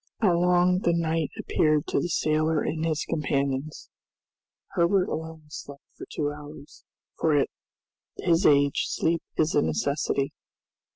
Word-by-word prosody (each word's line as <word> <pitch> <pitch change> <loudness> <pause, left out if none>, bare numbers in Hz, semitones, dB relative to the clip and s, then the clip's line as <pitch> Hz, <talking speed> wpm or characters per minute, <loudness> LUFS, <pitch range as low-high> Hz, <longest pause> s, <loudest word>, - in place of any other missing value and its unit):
How 195 -6 +3
long 180 +1 +3
the 170 -3 +1
night 165 -2 0
appeared 155 -2 +1
to - - +1
the 175 - -2
sailor 155 -1 +1
and 160 0 -2
his 160 -1 -1
companions! 140 -1 -2 0.8
Herbert 180 +2 +2
alone 160 0 -5
slept 140 -1 -9
for - - -9
two 145 -1 -1
hours, 145 0 -11 0.4
for 155 -2 +3
at 140 - +2 0.7
his 170 -1 +2
age 140 -1 +4
sleep 165 0 0 0.2
is 155 0 +2
a - - +4
necessity. 140 - -1
155 Hz, 135 wpm, -26 LUFS, 145-170 Hz, 0.8 s, age